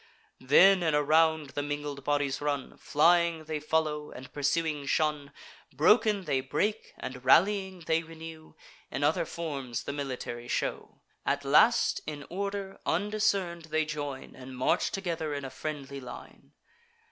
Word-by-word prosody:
Then 185 +9 +6
in 160 -3 +2
a 150 - +3
round 160 -1 +3
the 145 - -2
mingled 145 -1 -4
bodies 145 -1 0
run: 145 -2 -2
Flying 170 +1 +3
they 155 -1 -3
follow, 150 -1 -1
and 130 +1 -11
pursuing 150 0 0
shun; 150 -1 0 0.4
Broken, 200 - +4
they 135 -6 0
break; 150 +11 -2
and, 125 -1 -7
rallying, 190 +6 +3
they 165 0 +1
renew 160 -1 -11 0.3
In 140 - -3
other 150 +3 +2
forms 140 -8 -4
the - - -4
military 130 -4 -5
shew. - - -3 0.2
At 140 0 -1
last, 225 +12 +4
in 145 -2 -6
order, 200 +1 -4
undiscern'd 195 -2 0
they 155 0 0
join, 145 -3 -5
And 130 0 -10
march 130 - +2
together 170 -6 -3
in 140 -1 -4
a 130 - -6
friendly 140 -1 -6
line. 125 -1 -11
150 Hz, 145 wpm, -29 LUFS, 140-170 Hz, 0.4 s, Then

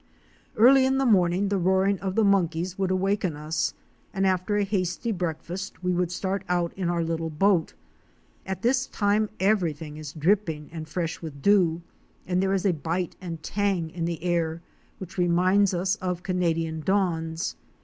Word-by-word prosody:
Early 260 +4 +7
in 265 0 +2
the 270 - +1
morning 190 -3 +3
the 200 -1 +1
roaring 190 +2 +2
of 190 -1 -3
the 225 - +3
monkeys 180 -3 +1
would 190 -1 -1
awaken 190 -2 0
us, 155 +1 -2 0.4
and 195 0 +1
after 190 +2 +1
a 205 - +2
hasty 195 +2 -1
breakfast 180 +1 -4
we 180 0 +1
would 175 -1 0
start 190 +1 -2
out 175 -1 0
in 185 -3 -2
our 170 -1 0
little 165 0 -2
boat. 175 +1 +2 0.7
At 190 +3 -5
this 255 +2 +2
time 205 +1 +1
everything 165 -7 0
is 155 -2 -7
dripping 160 -2 0
and 160 -1 -7
fresh 165 -1 -3
with 145 -4 -8
dew, 175 -5 +3 0.4
and 180 0 0
there 190 0 +1
is 190 +1 -1
a 190 - +4
bite 165 +3 -3
and 170 -3 -6
tang 195 -6 -1
in 170 -1 -3
the 170 -1 -4
air 170 -2 -1 0.3
which 185 0 -8
reminds 185 +3 +3
us 185 +3 0
of 180 -3 -3
Canadian 165 -3 -1
dawns. 165 -2 -1
180 Hz, 170 wpm, -26 LUFS, 165-195 Hz, 0.7 s, Early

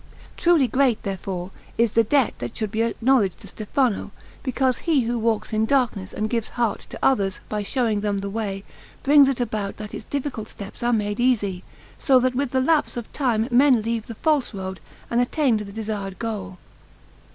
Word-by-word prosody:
Truly 335 -6 +4
great, 255 -1 +2
therefore, 190 -1 -4 0.3
is 230 -2 +3
the 230 - +4
debt 265 +1 +2
that 120 -1 -5
should 215 -2 -2
be 220 0 0
acknowledged 230 -3 +2
to - - -10
Stefano, 215 +2 -1 0.3
because 260 -1 0
he 315 -5 +2
who 235 0 -1
walks 225 0 0
in 215 +1 +2
darkness 235 -8 +1
and 215 - -2
gives 230 -1 -1
heart 235 -4 -1
to - - -7
others, 200 -8 +2
by 210 -1 -1
showing 220 -1 0
them 205 -1 0
the 200 0 -3
way, 200 -2 -3 0.4
brings 285 -1 +7
it 270 - -1
about 215 -4 -2
that 210 -1 -8
its - - -6
difficult 280 -6 -4
steps 200 0 -9
are 240 0 +2
made 210 -2 0
easy, 205 -7 +1 0.4
so 265 -4 +5
that 255 0 +1
with 265 0 -1
lapse 295 +1 +2
of 235 - -6
time 235 -5 +1
men 250 -2 +5
leave 230 0 -2
the 230 - -7
false 290 -5 +1
road 190 -1 -5 0.3
and 240 +1 +3
attain 255 0 +2
to - - -4
the 200 - -9
desired 205 -3 -4
goal. 200 -5 -4
225 Hz, 190 wpm, -23 LUFS, 205-255 Hz, 0.4 s, brings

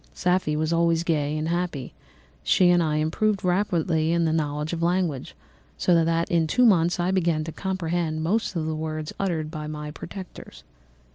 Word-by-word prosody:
Safie 180 -4 +1
was 155 +2 0
always 170 0 +2
gay 150 -3 0
and 155 +1 -2
happy; 170 -7 -2 0.5
she 180 -2 +4
and 175 0 +4
I 155 -2 0
improved 190 +7 0
rapidly 175 -4 +1
in 170 0 +2
the 160 - +1
knowledge 150 0 -2
of 165 - -3
language, 170 - -1 0.4
so 170 -2 +3
that 165 +1 0
in 165 -2 +2
two 250 +10 +3
months 175 -5 +3
I 175 +2 +1
began 170 -4 +1
to 160 - -6
comprehend 170 -4 -2
most 205 +4 0
of 160 -2 -1
the 160 - -2
words 155 0 -4
uttered 165 -5 -1
by 155 -2 -5
my 150 -1 -6
protectors. 185 +4 -10
165 Hz, 180 wpm, -25 LUFS, 155-180 Hz, 0.5 s, she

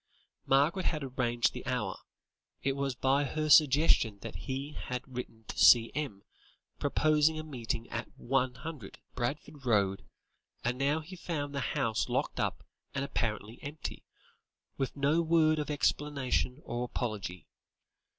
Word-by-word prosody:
Margaret 150 +8 +3
had 155 -3 0
arranged 120 -3 +1
the - - -6
hour; - - -1 0.7
it 135 0 +1
was 140 -2 -1
by 135 +3 +2
her 155 +3 -2
suggestion 145 -7 +6
that - - -6
he 135 +2 -4
had 125 -4 -5
written 125 -3 -7
to - - -5
C.M., 120 -2 +5 0.6
proposing 155 +1 +3
a 155 - -4
meeting 120 -6 -4
at 115 +1 -3
100, 130 -1 -2 0.2
Barford 140 +3 -4
Road, 100 -5 +2 0.6
and 125 +1 -1
now 145 +3 +2
he 175 +5 -10
found 150 -5 -3
the 140 - -1 0.2
house 110 -1 0
locked - - -1
up - - -1 0.3
and 140 0 0
apparently 110 -3 -3
empty, 150 +2 -6 0.7
with 135 +1 -3
no 145 +4 +3
word 160 -1 +4
of 150 -1 -3
explanation 140 -3 0
or 120 +1 -3
apology. 105 -7 -4
135 Hz, 135 wpm, -31 LUFS, 120-150 Hz, 0.7 s, suggestion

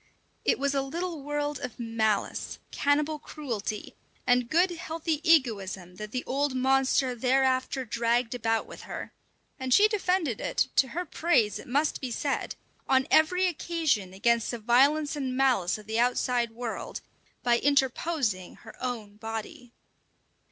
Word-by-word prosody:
It - - +2
was 280 +1 0
a 275 - +1
little 330 +3 -4
world 295 +1 -2
of 250 -1 -7
malice, 225 -3 -1
cannibal 300 +2 +1
cruelty, 230 -9 -5 0.3
and 245 -1 +3
good, 355 +5 +3
healthy 325 -2 -3
egoism 200 - +1
that 210 +1 -7
the 250 +1 -2
old 280 0 0
monster 265 0 +2
thereafter 260 +1 +1
dragged 235 +2 0
about 225 -2 0
with - - -11
her, - - -6 0.5
and 260 -1 -3
she 410 +11 +7
defended 365 - 0
it - - 0
to 265 - +5
her 350 +8 -4
praise 305 -11 +1
it - - -11
must 285 +5 0
be 260 - -3
said 275 +4 -2 0.3
on 265 0 +4
every 360 +4 +4
occasion 320 - 0
against 230 +4 +1
the 240 - -2
violence 275 +7 +3
and 260 -3 -3
malice 245 -10 +2
of 215 - -13
the 220 +2 -1
outside 245 0 +1
world, 230 0 -5 0.4
by 240 -1 +3
interposing 270 - 0
her 225 - -13
own 220 -5 -4
body. 225 +2 -6
255 Hz, 145 wpm, -28 LUFS, 230-295 Hz, 0.5 s, she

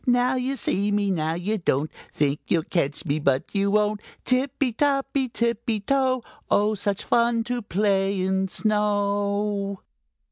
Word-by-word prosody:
Now 245 +1 +3
you 260 +1 -1
see 205 -5 +1
me! 205 -1 +1
Now 160 -2 0
you 205 +5 -2
don't! 150 -3 0 0.2
Think 145 0 0
you'll 165 -2 +2
catch 150 -5 -1
me, 145 +2 0
but 135 -2 0
you 200 -1 +1
won't! 210 0 +1 0.2
Tippy 260 0 +1
toppy 275 0 +1
tippy 235 -1 -1
toe, 260 +2 +1 0.3
Oh, 210 +1 +3
such 200 -1 -1
fun 235 -1 +2
to 245 +1 -3
play 195 -1 +1
in 190 +1 +1
snow!" 205 -1 0
205 Hz, 145 wpm, -24 LUFS, 195-240 Hz, 0.3 s, Now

